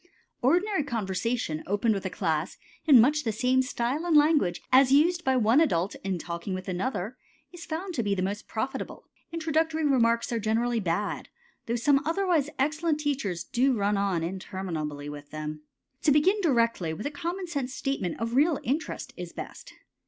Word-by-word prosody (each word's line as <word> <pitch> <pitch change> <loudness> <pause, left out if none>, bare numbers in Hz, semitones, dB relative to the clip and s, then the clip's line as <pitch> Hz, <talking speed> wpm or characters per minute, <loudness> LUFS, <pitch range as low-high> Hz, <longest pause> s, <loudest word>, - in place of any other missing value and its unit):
Ordinary 355 - +2
conversation 220 - -2
opened 205 +4 +2
with 195 -1 -3
a - - -4
class 165 -4 -2 0.3
in 275 -5 +9
much 295 +6 +4
the 225 - 0
same 255 +4 +2
style 255 +3 -2
and 340 -3 +4
language 295 - +3
as 260 0 +6
used 345 +5 +4
by 265 -2 +2
one 235 +5 +4
adult 185 - +1
in 190 -2 -1
talking 170 +3 -5
with 185 +1 -7
another 195 +4 -3 0.3
is 350 -1 -10
found 350 +3 -4
to 250 - 0
be 205 -2 0
the 185 - -1
most 200 +3 -3
profitable. 230 +5 -4 0.3
Introductory 320 -1 0
remarks 235 -3 +2
are 230 - 0
generally 230 +2 0
bad, 185 +1 -2 0.4
though 235 - 0
some 275 +4 +3
otherwise 330 -3 +1
excellent 310 +3 0
teachers 260 - -2
do 255 0 +1
run 205 0 +1
on 195 -4 0
interminably 165 -5 -4
with 145 0 -8
them. 155 0 -6 0.4
To 300 - +3
begin 370 +9 +3
directly 230 - +1
with 210 - -7
a 290 - -2
common 350 +5 -4
sense 280 -7 -3
statement 240 - -2
of 230 +1 -2
real 295 +3 +3
interest 285 +6 -3
is - - -6
best. - - -8
240 Hz, 175 wpm, -27 LUFS, 195-300 Hz, 0.4 s, in